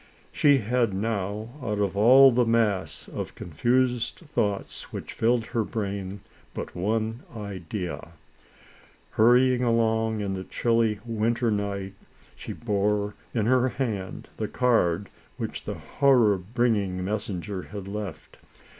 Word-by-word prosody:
She 145 Hz, -1 st, +4 dB
had 120 Hz, -3 st, 0 dB
now, 105 Hz, +1 st, -2 dB
out 105 Hz, -4 st, -2 dB
of 100 Hz, -2 st, 0 dB
all 130 Hz, +6 st, +8 dB
the 125 Hz, +1 st, +3 dB
mass 110 Hz, -5 st, 0 dB
of -, -, -6 dB
confused 120 Hz, -, 0 dB
thoughts 105 Hz, -, -3 dB
which -, -, -6 dB
filled 115 Hz, 0 st, +2 dB
her 115 Hz, -2 st, -1 dB
brain, 100 Hz, -2 st, -4 dB, 0.3 s
but -, -, -6 dB
one 110 Hz, +5 st, -1 dB, 0.2 s
idea. 95 Hz, -4 st, -5 dB, 1.0 s
Hurrying 125 Hz, +2 st, +4 dB
along, 110 Hz, -2 st, +1 dB
in 100 Hz, -1 st, -2 dB
the 95 Hz, -1 st, -4 dB
chilly 115 Hz, 0 st, +1 dB
winter 115 Hz, +1 st, 0 dB
night, 100 Hz, -2 st, -2 dB, 0.4 s
she -, -, -7 dB
bore, 105 Hz, -2 st, 0 dB, 0.2 s
in 110 Hz, -3 st, +1 dB
her 130 Hz, +2 st, +3 dB
hand, 110 Hz, -9 st, -4 dB
the -, -, -2 dB
card, 100 Hz, -7 st, +1 dB, 0.3 s
which -, -, -5 dB
the -, -, -3 dB
horror 125 Hz, -7 st, +3 dB
bringing 100 Hz, -3 st, 0 dB
messenger 100 Hz, -2 st, -3 dB
had 100 Hz, 0 st, -8 dB
left. 100 Hz, -3 st, -6 dB
110 Hz, 125 wpm, -26 LUFS, 100-120 Hz, 1.0 s, all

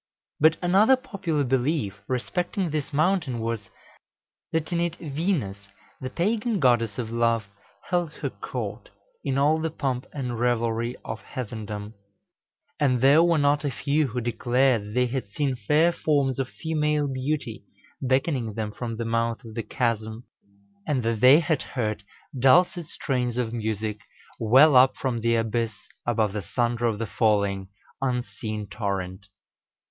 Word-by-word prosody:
But 160 Hz, +2 st, +5 dB
another 200 Hz, +8 st, +5 dB
popular 200 Hz, -, -2 dB
belief 125 Hz, -, 0 dB
respecting 175 Hz, +7 st, -2 dB
this 150 Hz, -2 st, -3 dB
mountain 155 Hz, -3 st, +1 dB
was, 115 Hz, -2 st, -3 dB, 0.8 s
that 160 Hz, 0 st, -1 dB
in 170 Hz, -, +1 dB
it 170 Hz, -1 st, 0 dB
Venus, 140 Hz, -, -2 dB, 0.3 s
the 130 Hz, -, -3 dB
pagan 215 Hz, -, 0 dB
Goddess 120 Hz, -, +2 dB
of 115 Hz, -2 st, -4 dB
Love, 115 Hz, -1 st, +1 dB, 0.4 s
held 175 Hz, -3 st, 0 dB
her -, -, -4 dB
court, -, -, -6 dB, 0.3 s
in 135 Hz, -, -1 dB
all 150 Hz, +3 st, +3 dB
the 160 Hz, -, 0 dB
pomp 135 Hz, -5 st, -3 dB
and 125 Hz, -5 st, -4 dB
revelry 120 Hz, 0 st, 0 dB
of 110 Hz, -, -5 dB
heathendom; 105 Hz, -3 st, -6 dB, 0.9 s
and 130 Hz, -4 st, +3 dB
there 140 Hz, +5 st, +6 dB
were 170 Hz, -1 st, +4 dB
not 145 Hz, 0 st, +2 dB
a 145 Hz, -, 0 dB
few 145 Hz, +2 st, 0 dB
who 125 Hz, 0 st, -3 dB
declared 120 Hz, 0 st, +1 dB
that 105 Hz, -, -9 dB
they 125 Hz, 0 st, +3 dB
had 125 Hz, -4 st, -3 dB
seen 140 Hz, -3 st, 0 dB
fair 150 Hz, +9 st, +3 dB
forms 140 Hz, -6 st, +1 dB
of 130 Hz, -2 st, -1 dB
female 150 Hz, -2 st, 0 dB
beauty 130 Hz, -3 st, -3 dB, 0.4 s
beckoning 130 Hz, -3 st, 0 dB
them 110 Hz, -2 st, -3 dB
from 115 Hz, +1 st, -5 dB
the 115 Hz, -, -3 dB
mouth 115 Hz, +2 st, -1 dB
of 110 Hz, -, -9 dB
the 115 Hz, -, -2 dB
chasm, 110 Hz, 0 st, -2 dB, 0.6 s
and 135 Hz, -5 st, 0 dB
that 115 Hz, -1 st, 0 dB
they 130 Hz, +7 st, +7 dB
had 160 Hz, -3 st, 0 dB
heard 110 Hz, -5 st, -3 dB, 0.4 s
dulcet 170 Hz, +6 st, +4 dB
strains 125 Hz, -7 st, -2 dB
of 120 Hz, -2 st, -1 dB
music 110 Hz, -2 st, -2 dB, 0.4 s
well 130 Hz, +6 st, +6 dB
up 130 Hz, +1 st, +6 dB
from 125 Hz, -3 st, -2 dB
the 115 Hz, +1 st, +2 dB
abyss 115 Hz, -1 st, -1 dB, 0.3 s
above 110 Hz, -4 st, +1 dB
the 105 Hz, -, -2 dB
thunder 120 Hz, +5 st, 0 dB
of 110 Hz, -2 st, -1 dB
the 115 Hz, -, -2 dB
falling, 100 Hz, -3 st, +1 dB, 0.3 s
unseen 120 Hz, -4 st, -3 dB
torrent. 100 Hz, -2 st, -4 dB
125 Hz, 150 wpm, -25 LUFS, 115-150 Hz, 0.9 s, they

